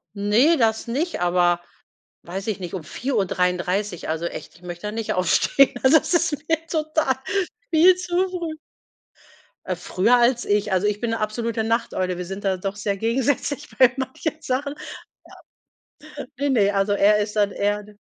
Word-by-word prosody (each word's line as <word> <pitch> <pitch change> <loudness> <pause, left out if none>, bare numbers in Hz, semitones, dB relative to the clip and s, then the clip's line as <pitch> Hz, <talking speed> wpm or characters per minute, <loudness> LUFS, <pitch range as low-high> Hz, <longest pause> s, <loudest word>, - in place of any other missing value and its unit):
Ne, 220 +11 +3
das 225 -3 +1
nicht, 290 - -2
aber, 175 0 +2 0.6
weiß 190 +4 -6
ich 215 -3 -2
nicht, 175 -2 -7
um 185 -4 -4
4:33, 180 - -1
also, 160 +2 -2
echt, - - -7
ich 170 - -20
möchte 175 +2 -7
da - - -3
nicht 220 -1 -2
aufstehen. 185 +9 +3
Also, 265 +4 +7
das - - -4
ist 340 -2 +2 0.2
mir 325 0 +1
total 310 -4 0 0.5
viel 345 +3 +6
zu 360 +1 0
früh. 340 -4 -5 1.1
Äh, 185 - -2
früher 185 +6 +2
als 240 0 +2
ich. 205 0 +1
Also, 190 +2 +2
ich 210 0 -1
bin 235 - -1
'ne 225 - -2
absolute 220 +1 -2
Nachteule. 220 -5 -1
Wir 180 - -5
sind 195 +3 -7
da 190 -1 0
doch 195 +2 -4
sehr 200 -1 -2
gegensätzlich 265 +6 -1
bei 255 -2 +6
manchen 270 +4 -3
Sachen, 280 +2 -2 1.4
ja. - - -5
Ne, 285 0 0
ne, 210 -6 +3
also, 195 +1 +1
er 205 +1 +4
ist 210 +1 -3
dann 205 -1 +2
eher 205 +1 -1
d 210 +1 -16
215 Hz, 170 wpm, -23 LUFS, 195-270 Hz, 1.4 s, Also